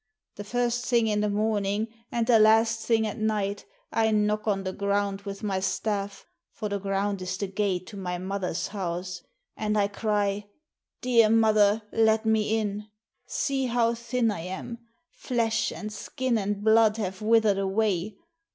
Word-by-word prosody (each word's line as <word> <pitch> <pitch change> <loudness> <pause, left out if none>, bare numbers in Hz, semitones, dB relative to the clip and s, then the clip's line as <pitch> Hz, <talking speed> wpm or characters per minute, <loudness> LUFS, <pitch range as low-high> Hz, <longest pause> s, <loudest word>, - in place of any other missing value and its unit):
The 205 - -5
first 245 +2 -1
thing 235 -2 +3
in 210 -1 +1
the 210 - +1
morning 205 0 0 0.2
and 235 -1 0
the 230 -2 +5
last 225 +1 +4
thing 225 -2 +3
at 215 +1 -4
night 205 -2 -1 0.3
I 220 -1 +2
knock 210 0 +1
on 195 -2 +1
the 185 0 -3
ground 200 0 -1
with 195 +2 -8
my 195 -2 0
staff, 200 0 -2 0.3
for 215 -2 -5
the 200 0 -2
ground 195 0 -1
is 185 0 -3
the 200 - -2
gate 190 -2 -1
to 205 - -10
my 180 -2 -3
mother's 185 -2 -3
house; 180 -2 -4 0.3
and 215 0 -1
I 200 -1 +3
cry, 205 -1 -1 0.2
* - - -61
Dear 235 -3 +5
mother, 215 -1 +4
let 220 0 +3
me 220 0 +2
in! 210 -1 -3 0.4
See 270 -2 -1
how 235 -1 +2
thin 235 0 0
I 205 - -4
am! 190 +7 -6 0.3
Flesh 225 -3 -1
and 215 0 -6
skin 255 +2 -2
and 205 -1 -2
blood 220 0 +5
have 190 -3 -4
withered 215 -2 +3
away. 195 0 0
210 Hz, 170 wpm, -27 LUFS, 200-225 Hz, 0.4 s, the